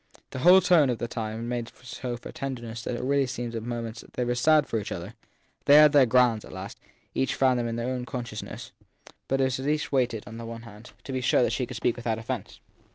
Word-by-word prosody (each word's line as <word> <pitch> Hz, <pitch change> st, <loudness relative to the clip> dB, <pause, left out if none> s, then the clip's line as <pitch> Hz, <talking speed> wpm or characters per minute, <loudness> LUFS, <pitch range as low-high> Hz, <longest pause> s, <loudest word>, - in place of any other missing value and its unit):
The -, -, -5 dB
whole 180 Hz, +7 st, +7 dB
tone 160 Hz, -8 st, +5 dB
of 120 Hz, -, 0 dB
the 120 Hz, -, -3 dB
time 115 Hz, 0 st, -4 dB
made 120 Hz, -1 st, -3 dB
so 125 Hz, -1 st, -5 dB
for 120 Hz, -, -10 dB
tenderness 120 Hz, -4 st, -5 dB
that -, -, -3 dB
it -, -, -4 dB
really 140 Hz, 0 st, +2 dB
seemed 120 Hz, -1 st, -4 dB
as 115 Hz, -, -5 dB
if -, -, -4 dB
at 115 Hz, -, -8 dB
moments 115 Hz, -1 st, -5 dB
they 125 Hz, -, -1 dB
were 120 Hz, -, 0 dB
sad 150 Hz, +4 st, +4 dB
for 115 Hz, -, -1 dB
each 105 Hz, -, -6 dB
other. 90 Hz, +4 st, -6 dB, 0.5 s
They 145 Hz, -, +7 dB
had 150 Hz, 0 st, +8 dB
their 140 Hz, -3 st, +6 dB
grounds 120 Hz, -2 st, +3 dB
at -, -, -12 dB
last: 95 Hz, +2 st, -8 dB, 0.3 s
each 135 Hz, -, 0 dB
found 130 Hz, -2 st, +3 dB
them 120 Hz, -, -1 dB
in 115 Hz, 0 st, -3 dB
her 120 Hz, -, -2 dB
own 125 Hz, 0 st, -2 dB
consciousness; 120 Hz, -4 st, -6 dB, 0.6 s
but 135 Hz, -, 0 dB
it -, -, +3 dB
was 130 Hz, 0 st, 0 dB
as 135 Hz, -, -4 dB
if -, -, +3 dB
each 150 Hz, -, -5 dB
waited, 125 Hz, -5 st, +1 dB
on 110 Hz, +2 st, -9 dB
the 115 Hz, 0 st, -7 dB
other 115 Hz, 0 st, -8 dB
hand, 110 Hz, +1 st, -13 dB
to -, -, -7 dB
be 130 Hz, -, -1 dB
sure 125 Hz, 0 st, +3 dB
she 125 Hz, -3 st, -1 dB
could 125 Hz, -, -6 dB
speak 120 Hz, +1 st, 0 dB
without 115 Hz, -2 st, -2 dB
offence. 115 Hz, -1 st, -5 dB
120 Hz, 260 wpm, -27 LUFS, 115-130 Hz, 0.6 s, had